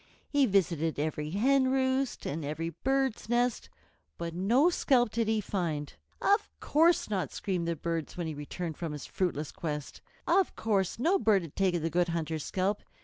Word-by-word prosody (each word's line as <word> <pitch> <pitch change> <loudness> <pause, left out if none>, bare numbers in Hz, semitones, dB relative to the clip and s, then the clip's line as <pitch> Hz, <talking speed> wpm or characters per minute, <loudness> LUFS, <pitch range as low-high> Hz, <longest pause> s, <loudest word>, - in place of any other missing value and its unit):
He 285 -2 +4
visited 170 -5 +1
every 150 0 -2
hen 260 - +3
roost 265 -1 0
and 155 +3 -3
every 155 +3 -3
bird's 265 - -1
nest, 240 0 +1 0.5
but 170 -1 -4
no 235 - +3
scalp 245 -8 +3
did 230 -1 0
he 220 0 +2
find. 165 -8 -2 0.3
"Of 405 +2 +2
course 330 +3 +3
not!" 195 -4 -2
screamed 180 -4 -2
the 170 - 0
birds 165 +1 -3
when 175 - -2
he 160 - -3
returned 155 +2 -5
from 165 -3 -4
his 150 - -6
fruitless 160 -5 -2
quest, 150 -3 -5 0.2
"Of 370 +2 +2
course 195 -5 0
no 345 +11 +2
bird 205 - +3
has 165 - -8
taken 180 -4 +1
the 165 - -1
Good 175 +1 +2
Hunter's 160 -2 -2
scalp. 195 +2 -1
185 Hz, 175 wpm, -30 LUFS, 165-245 Hz, 0.5 s, He